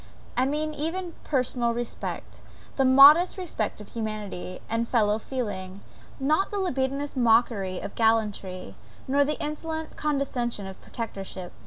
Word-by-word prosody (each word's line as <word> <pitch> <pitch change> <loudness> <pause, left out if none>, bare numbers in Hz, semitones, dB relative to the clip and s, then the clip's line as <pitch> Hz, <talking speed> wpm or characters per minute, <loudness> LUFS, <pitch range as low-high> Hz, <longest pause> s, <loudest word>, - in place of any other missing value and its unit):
I 255 +1 +2
mean 305 +2 -1
even 335 +4 -3
personal 250 -4 0
respect 240 -1 -5 0.4
the 270 - +3
modest 285 +8 +8
respect 315 - -3
of 210 - -11
humanity, 215 -5 -5
and 230 +1 -1
fellow 215 -3 +2
feeling; 200 -7 -5 0.4
not 310 +8 +2
the 410 - -3
libidinous 280 -6 -1
mockery 225 -6 +2
of - - -6
gallantry, 210 - 0 0.3
nor 280 +2 +4
the 300 +2 -2
insolent 315 +1 -4
condescension 265 -7 -1
of 190 0 -9
protectorship. 195 -5 -6
245 Hz, 130 wpm, -26 LUFS, 210-295 Hz, 0.4 s, modest